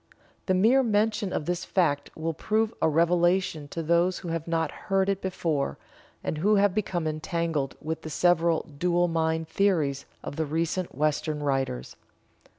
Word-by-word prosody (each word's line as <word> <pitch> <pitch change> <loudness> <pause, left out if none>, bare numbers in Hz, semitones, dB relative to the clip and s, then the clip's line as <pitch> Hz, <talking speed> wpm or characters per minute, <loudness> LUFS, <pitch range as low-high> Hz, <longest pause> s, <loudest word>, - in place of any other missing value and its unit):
The 185 - +3
mere 230 +8 +5
mention 210 -3 +1
of 150 - -2
this 175 +1 -2
fact 155 -7 +1
will 165 +1 -2
prove 220 +6 0
a - - +4
revelation 170 -1 +2
to 165 +3 -5
those 170 +3 +2
who 175 - -6
have 165 -1 -3
not 165 -2 0 0.2
heard 195 0 +2
it 195 -1 0
before, 165 -6 -1 0.5
and 155 - -2
who 210 +6 +3
have 200 -1 +3
become 185 -5 -1
entangled 155 -2 -2
with 160 +1 -4
the 155 - -7
several 170 +1 +2 0.2
"dual 175 0 +2
mind" 160 -1 0
theories 160 -8 +1 0.2
of - - -6
the 160 - 0
recent 165 +3 -2
Western 150 +1 0
writers. 135 - -2
170 Hz, 160 wpm, -27 LUFS, 155-185 Hz, 0.5 s, mere